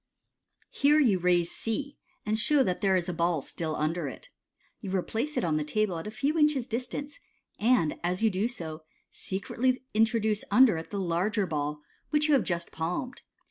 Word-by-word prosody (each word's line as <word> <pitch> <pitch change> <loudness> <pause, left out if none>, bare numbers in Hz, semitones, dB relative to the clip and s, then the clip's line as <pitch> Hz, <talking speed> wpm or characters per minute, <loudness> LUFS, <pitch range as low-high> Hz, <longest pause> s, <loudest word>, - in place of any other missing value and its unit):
Here 295 +2 +4
you 220 -11 +3
raise 175 -1 +2
C, 280 +6 -4 0.3
and 215 0 +1
show 270 +6 +3
that 180 -5 -2
there 195 -2 +3
is 180 -1 0
a 180 - -2
ball 170 -3 0
still 160 -2 -3
under 160 +3 -1
it. - - -9 0.5
You 200 - -7
replace 230 +10 -2
it - - +1
on 160 -3 +1
the 155 - 0
table 180 +3 -1
at 165 - -7
a - - -3
few 280 +8 -1
inches' 300 -5 +3
dis 240 +2 -2
tance, 290 - -6 0.4
and 220 -8 +2
as 180 +4 0
you 220 - +4
do 195 +4 0
so, 165 -9 -6 0.3
secretly 250 +7 -1
introduce 220 -1 +2
under 250 -8 +6
it 160 - -7
the 200 - -3
larger 190 +4 0
ball 150 -2 -3 0.3
which 300 0 +2
you 305 - +3
have 270 - +4
just 170 -3 -3
palmed. 180 +10 -4
210 Hz, 190 wpm, -28 LUFS, 170-250 Hz, 0.5 s, under